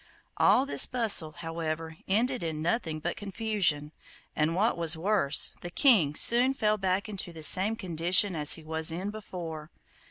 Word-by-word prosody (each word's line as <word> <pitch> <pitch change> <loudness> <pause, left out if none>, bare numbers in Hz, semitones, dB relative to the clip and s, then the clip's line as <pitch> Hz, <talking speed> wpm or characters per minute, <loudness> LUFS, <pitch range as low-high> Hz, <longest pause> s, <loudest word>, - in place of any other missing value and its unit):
All 265 - +2
this 280 - +4
bustle, 220 -10 +1
however, 165 -1 -7
ended 240 +6 -1
in 160 -2 -5
nothing 165 -2 -3
but 175 +2 -4
confusion, 195 -8 -1 0.4
and, 155 +2 -1
what 215 +5 0
was 165 -1 +2
worse, 170 -5 0
the 175 - -8
King 180 - +2
soon 250 - +4
fell 215 -4 -1
back 190 +2 -2
into 195 -4 -3
the 160 -2 -8
same 195 +8 +6
condition 180 0 0
as 150 -1 +3
he 160 - -8
was 160 0 +1
in 185 +5 -6
before. 170 -7 -9
175 Hz, 160 wpm, -27 LUFS, 160-215 Hz, 0.4 s, same